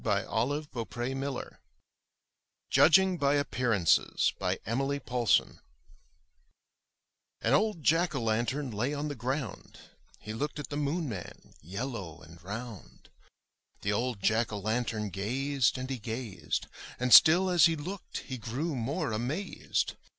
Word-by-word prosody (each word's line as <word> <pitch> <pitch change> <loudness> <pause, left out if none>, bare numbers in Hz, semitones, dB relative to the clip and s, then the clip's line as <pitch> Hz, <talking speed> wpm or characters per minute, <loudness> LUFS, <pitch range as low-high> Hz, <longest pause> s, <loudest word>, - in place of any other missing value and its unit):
174 120 +6 -1
UP 115 - -9
ONE 120 +2 -1
PAIR 140 +1 -1
OF - - -4
STAIRS - - -7 1.2
JUDGING 190 +2 +5
BY 140 0 +3
APPEARANCES* 120 - +2 0.3
Emilie 135 +6 -1
Poulsson 125 -3 +1 1.8
An 115 - +2
old 190 0 +2
Jack 165 +2 +3
o' - - 0
lantern 120 +5 0
lay 120 +8 -1
on 150 +1 -3
the - - -3
ground; 130 +4 -4 0.4
He 105 - -7
looked 145 +7 -3
at 150 - -6
the 145 - -4
Moon 150 +3 -1
man, 105 -8 -8
yellow 95 - -5
and 80 +1 -14
round. 110 +2 -8 0.7
The 105 - 0
old 115 -2 -2
Jack 110 +2 +2
o' 105 - -3
lantern 110 0 -2
gazed 130 +7 0
and 130 0 -4
he 130 -2 -4
gazed, 105 -8 -4 0.3
And 125 0 +2
still 180 +4 +8
as 175 -5 +6
he 165 - 0
looked 175 +5 -6
he 130 -2 -6
grew 135 +9 -3
more 125 0 -2
amazed. 130 - -2
125 Hz, 140 wpm, -30 LUFS, 110-145 Hz, 1.8 s, still